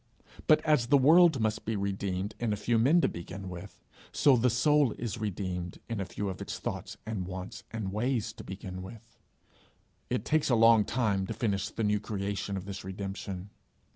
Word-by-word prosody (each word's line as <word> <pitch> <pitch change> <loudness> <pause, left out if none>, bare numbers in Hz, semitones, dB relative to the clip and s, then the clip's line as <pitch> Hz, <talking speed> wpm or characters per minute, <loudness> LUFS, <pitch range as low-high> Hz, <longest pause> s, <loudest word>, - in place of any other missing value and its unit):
But 155 - +5
as 150 -6 +3
the 140 - +6
world 160 +2 +6
must 110 0 0
be 110 - -2
redeemed 100 0 -2
in 120 -2 0
a - - +1
few 115 +2 +1
men 150 +9 +5
to - - +3
begin 95 +3 -7
with, 90 +3 -10 0.3
so 140 -3 +5
the 125 +1 +3
soul 145 +2 +3
is 115 -1 -5
redeemed 90 -4 -4
in 115 -3 -3
a 95 - -2
few 100 +3 -4
of 95 - -5
its - - -4
thoughts - - -5
and 105 -5 -3
wants 95 0 -6
and 105 -4 -4
ways, 120 +1 -1
to - - -10
begin 95 -1 -7
with: 115 +4 -11 0.9
it - - -1
takes 155 -2 +2
a 120 - +4
long 115 -2 +6
time 100 -6 0
to - - -4
finish 100 -3 -1
the 115 - -4
new 105 0 +2
creation 100 -1 -3
of 95 - -6
this 100 -1 -6
redemption. 95 0 -6
105 Hz, 195 wpm, -30 LUFS, 95-120 Hz, 0.9 s, the